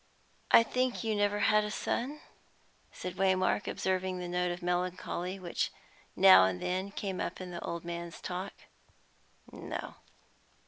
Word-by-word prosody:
"I 230 Hz, -, +8 dB
think 250 Hz, +1 st, -1 dB
you 220 Hz, -1 st, 0 dB
never 205 Hz, 0 st, +1 dB
had 215 Hz, -1 st, +4 dB
a 210 Hz, -, -3 dB
son?" 270 Hz, +7 st, -2 dB, 0.7 s
said 180 Hz, -, -7 dB
Waymark, 190 Hz, +1 st, +2 dB
observing 185 Hz, 0 st, -1 dB
the 180 Hz, 0 st, -5 dB
note 180 Hz, 0 st, 0 dB
of 175 Hz, +1 st, -6 dB
melancholy 180 Hz, +1 st, -2 dB
which 180 Hz, -3 st, -2 dB, 0.5 s
every -, -, -4 dB
now 95 Hz, 0 st, +10 dB
and 95 Hz, -1 st, -1 dB
then 185 Hz, -, -2 dB
came 195 Hz, -2 st, -4 dB
up -, -, -4 dB
in 185 Hz, -1 st, -7 dB
the 175 Hz, -, -6 dB
old 170 Hz, 0 st, -4 dB
man's 170 Hz, 0 st, -6 dB
talk. 185 Hz, +2 st, -5 dB, 1.0 s
"No." -, -, -6 dB
185 Hz, 150 wpm, -31 LUFS, 175-205 Hz, 1.0 s, now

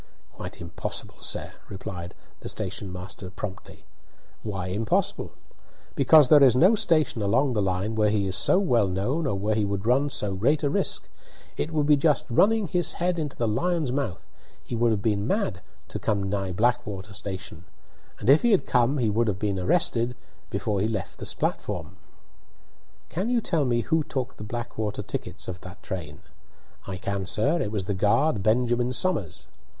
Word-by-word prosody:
"Quite -, -, -8 dB
impossible, 85 Hz, -1 st, -6 dB
sir," -, -, -2 dB, 0.2 s
replied 90 Hz, -2 st, -7 dB, 0.2 s
the -, -, -6 dB
station 95 Hz, -2 st, -3 dB
master 90 Hz, +1 st, -7 dB
promptly. 95 Hz, +1 st, -8 dB, 0.6 s
"Why 95 Hz, -4 st, -4 dB
impossible?" 105 Hz, +4 st, -1 dB, 0.6 s
"Because 145 Hz, +1 st, +6 dB
there 145 Hz, +2 st, +7 dB
is 130 Hz, -3 st, +7 dB
no 180 Hz, -, +6 dB
station 155 Hz, -, +2 dB
along 125 Hz, +7 st, +2 dB
the 105 Hz, -, +1 dB
line 95 Hz, +3 st, -1 dB
where 105 Hz, -1 st, +2 dB
he 105 Hz, -1 st, +1 dB
is 95 Hz, -1 st, 0 dB
so 105 Hz, -, +5 dB
well 120 Hz, -, +3 dB
known 125 Hz, -, -1 dB
or 100 Hz, -, 0 dB
where 105 Hz, +3 st, 0 dB
he 105 Hz, 0 st, +1 dB
would 100 Hz, 0 st, -2 dB
run 135 Hz, +5 st, +3 dB
so 105 Hz, -7 st, +1 dB
great 130 Hz, +11 st, +1 dB
a 140 Hz, -, +1 dB
risk. -, -, 0 dB, 0.5 s
It 155 Hz, -, -2 dB
would 150 Hz, -2 st, +1 dB
be 150 Hz, 0 st, +5 dB
just 150 Hz, 0 st, +2 dB
running 215 Hz, -, +4 dB
his 175 Hz, +1 st, +1 dB
head 175 Hz, 0 st, -1 dB
into 150 Hz, -3 st, -4 dB
the 115 Hz, -, 0 dB
lion's 150 Hz, +5 st, 0 dB
mouth; 130 Hz, -9 st, -3 dB, 0.4 s
he -, -, -5 dB
would 120 Hz, +1 st, +3 dB
have 105 Hz, -3 st, 0 dB
been 105 Hz, -2 st, 0 dB
mad 195 Hz, -, -1 dB, 0.3 s
to -, -, -5 dB
come 100 Hz, -2 st, 0 dB
nigh 95 Hz, -1 st, -2 dB
Blackwater 105 Hz, -1 st, -1 dB
station; 95 Hz, -3 st, -7 dB, 0.5 s
and -, -, -6 dB
if 140 Hz, +4 st, +7 dB
he 240 Hz, -, +3 dB
had 200 Hz, -5 st, +3 dB
come 125 Hz, +3 st, +2 dB
he 115 Hz, -5 st, +1 dB
would 115 Hz, +2 st, +1 dB
have 100 Hz, -3 st, 0 dB
been 100 Hz, -2 st, -1 dB
arrested 120 Hz, -, +1 dB, 0.3 s
before 100 Hz, -2 st, -1 dB
he 105 Hz, -, +2 dB
left 105 Hz, -6 st, -4 dB
the -, -, 0 dB
platform." 80 Hz, +4 st, -3 dB, 1.1 s
"Can 190 Hz, +8 st, -2 dB
you 245 Hz, -1 st, +3 dB
tell 165 Hz, -9 st, 0 dB
me 120 Hz, -2 st, +1 dB
who 160 Hz, +4 st, +1 dB
took 130 Hz, -3 st, -4 dB
the -, -, -7 dB
Blackwater 110 Hz, -2 st, -4 dB
tickets 90 Hz, -2 st, -5 dB
of 90 Hz, -1 st, -6 dB
that 95 Hz, +1 st, -11 dB
train?" 75 Hz, -5 st, -6 dB, 0.7 s
"I 95 Hz, -1 st, -4 dB
can, 100 Hz, 0 st, -3 dB
sir. 145 Hz, -, +2 dB
It 105 Hz, -, -2 dB
was 100 Hz, -4 st, -2 dB
the 100 Hz, -, -1 dB
guard, 110 Hz, +5 st, +2 dB
Benjamin 120 Hz, +3 st, +2 dB
Somers." 125 Hz, -, -1 dB
110 Hz, 180 wpm, -26 LUFS, 100-140 Hz, 1.1 s, there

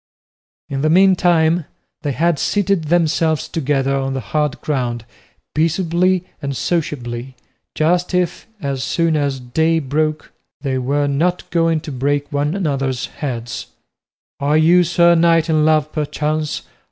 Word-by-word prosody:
In 135 Hz, -1 st, -3 dB
the 155 Hz, -, +2 dB
meantime, 175 Hz, -2 st, +4 dB, 0.4 s
they 145 Hz, -2 st, -2 dB
had 165 Hz, +2 st, +1 dB
seated 200 Hz, -4 st, +1 dB
themselves 160 Hz, -1 st, +1 dB
together 135 Hz, -3 st, 0 dB
on 135 Hz, 0 st, -2 dB
the -, -, -1 dB
hard 150 Hz, -2 st, 0 dB
ground 120 Hz, -5 st, -2 dB, 0.5 s
peaceably 170 Hz, +3 st, +1 dB, 0.2 s
and 140 Hz, -2 st, -3 dB
sociably, 130 Hz, -6 st, -3 dB, 0.4 s
just 175 Hz, +3 st, +1 dB
as -, -, +5 dB
if, 180 Hz, -, -3 dB
as 140 Hz, -5 st, -3 dB
soon 165 Hz, -2 st, +1 dB
as 140 Hz, -3 st, 0 dB
day 160 Hz, +7 st, +1 dB
broke, 155 Hz, +1 st, -1 dB, 0.3 s
they 130 Hz, -2 st, -1 dB
were 140 Hz, +3 st, 0 dB
not 160 Hz, +6 st, 0 dB
going 165 Hz, -2 st, +2 dB
to 155 Hz, -, -7 dB
break 145 Hz, +2 st, -1 dB
one 145 Hz, +4 st, 0 dB
another's 135 Hz, -8 st, -1 dB, 0.2 s
heads. 120 Hz, -5 st, -4 dB, 0.7 s
"Are 145 Hz, +2 st, +2 dB
you, 170 Hz, +3 st, +5 dB
sir 170 Hz, 0 st, +4 dB
knight, 165 Hz, -1 st, +3 dB
in 155 Hz, -1 st, +3 dB
love 155 Hz, -1 st, +2 dB
perchance?" 155 Hz, 0 st, -2 dB
155 Hz, 140 wpm, -19 LUFS, 140-170 Hz, 0.7 s, as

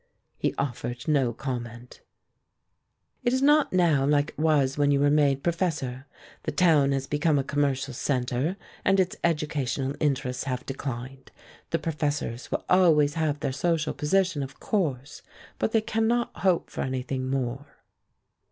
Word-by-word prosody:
He -, -, 0 dB
offered 120 Hz, -2 st, -4 dB
no 140 Hz, -6 st, +2 dB
comment. 120 Hz, -1 st, -6 dB, 1.2 s
"It 240 Hz, 0 st, +2 dB
is 260 Hz, -, +1 dB
not 295 Hz, +1 st, +4 dB
now 170 Hz, -7 st, +3 dB
like 145 Hz, +1 st, +2 dB
it -, -, -15 dB
was 145 Hz, -4 st, +2 dB
when 145 Hz, -1 st, +2 dB
you 140 Hz, -1 st, +3 dB
were 145 Hz, 0 st, +3 dB
made 140 Hz, -2 st, +3 dB
professor. 155 Hz, -7 st, -2 dB, 0.3 s
The -, -, -3 dB
town 155 Hz, -6 st, +4 dB
has 135 Hz, -1 st, -1 dB
become 150 Hz, +2 st, +1 dB
a 135 Hz, -, +1 dB
commercial 140 Hz, -2 st, -1 dB
centre 130 Hz, +6 st, -1 dB, 0.3 s
and 195 Hz, 0 st, +3 dB
its 185 Hz, -1 st, +1 dB
educational 145 Hz, -4 st, -1 dB
interests 135 Hz, -3 st, -1 dB
have 130 Hz, -2 st, -3 dB
declined. 130 Hz, -1 st, -6 dB, 0.4 s
The 165 Hz, -, +1 dB
professors 150 Hz, -6 st, -3 dB
will -, -, -2 dB
always 160 Hz, -6 st, +4 dB
have 155 Hz, -3 st, -1 dB
their -, -, -1 dB
social 160 Hz, +3 st, 0 dB
position, 180 Hz, 0 st, +1 dB
of 135 Hz, 0 st, -7 dB
course, 145 Hz, -, -2 dB, 0.4 s
but -, -, 0 dB
they 225 Hz, -, +3 dB
cannot 225 Hz, +2 st, 0 dB
hope 185 Hz, -3 st, +1 dB
for -, -, -4 dB
anything 130 Hz, 0 st, -3 dB
more." 135 Hz, +1 st, -2 dB
145 Hz, 150 wpm, -26 LUFS, 130-165 Hz, 1.2 s, not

